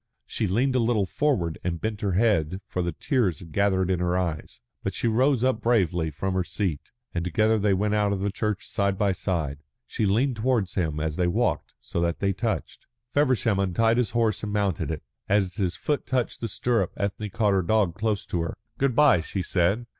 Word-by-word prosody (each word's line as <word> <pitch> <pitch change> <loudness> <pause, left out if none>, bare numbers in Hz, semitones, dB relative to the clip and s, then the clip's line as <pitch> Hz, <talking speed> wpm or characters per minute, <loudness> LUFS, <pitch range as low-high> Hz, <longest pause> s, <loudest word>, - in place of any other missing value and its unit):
She - - -1
leaned 125 +8 +1
a - - +4
little 115 -3 +2
forward 95 - 0
and 85 -1 -2
bent 110 +1 -3
her 100 -4 0
head, 95 -4 +2
for 90 - -3
the 85 0 -1
tears 105 - 0
had 85 +1 -11
gathered 95 0 +2
in 90 - +1
her 90 0 +1
eyes. 85 -4 -3 0.2
But - - -3
she - - 0
rose 125 +2 +2
up 130 -3 +1
bravely 90 -8 +2
from 95 +6 -3
her 95 0 +1
seat, 90 -5 -3 0.2
and 85 - -1
together 110 +5 +2
they 100 -1 +2
went 105 +2 0
out 105 -1 +2
of 100 - -1
the 100 +1 -1
church 105 0 -2
side 100 -1 0
by 100 -1 +2
side. 80 -6 -2 0.2
She 105 - -1
leaned 120 +5 +1
towards 110 -5 +1
him 80 -5 -1
as 75 0 -2
they 90 - +2
walked 110 +8 0
so 85 - -3
that 85 -1 0
they 100 0 0
touched. 110 +4 -3 0.2
Feversham 125 -8 +2
untied 115 +5 +2
his 125 - +1
horse 115 -3 +1
and 105 - -4
mounted 100 -4 0
it. 80 -2 -4 0.3
As 100 -2 +1
his 95 -4 0
foot 145 -1 -2
touched 130 -3 -1
the 115 - -1
stirrup 115 -2 0
Ethne 100 +1 -2
caught 105 -2 +1
her 95 - +3
dog 95 0 +2
close 105 +1 -1
to 85 - -2
her. 85 - -4 0.2
"Good 135 -3 +1
bye," 145 - +5
she 95 +3 -3
said. 95 +8 +1
100 Hz, 215 wpm, -26 LUFS, 90-115 Hz, 0.3 s, bye